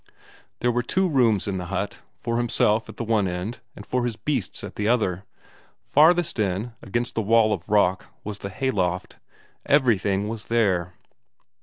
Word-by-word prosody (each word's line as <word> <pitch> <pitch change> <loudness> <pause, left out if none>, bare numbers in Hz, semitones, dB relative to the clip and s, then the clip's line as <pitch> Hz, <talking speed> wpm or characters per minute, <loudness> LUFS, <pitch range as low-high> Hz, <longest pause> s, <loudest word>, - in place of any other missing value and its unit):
There 125 - +2
were 120 +1 +1
two 185 +10 +1
rooms 120 - +2
in 95 -2 -2
the 90 - -5
hut; 100 +2 -3 0.2
for 115 0 -2
himself 115 -2 +2
at - - -10
the - - -3
one 110 -3 +1
end, 90 +6 -4 0.2
and 105 - -10
for 125 -1 -1
his 120 -2 -2
beasts 125 - -3
at - - -7
the 105 - -1
other. 105 -5 +1 0.6
Farthest 170 -1 +4
in, 105 +3 -1
against 120 +4 -2
the 115 - 0
wall 110 0 +4
of 95 0 -6
rock, 95 -3 +2 0.2
was 105 -1 -6
the 100 - -5
hayloft. 95 -6 -2 0.5
Everything 105 -8 +2
was 110 0 -5
there. 95 -7 +1
110 Hz, 170 wpm, -24 LUFS, 95-120 Hz, 0.6 s, Farthest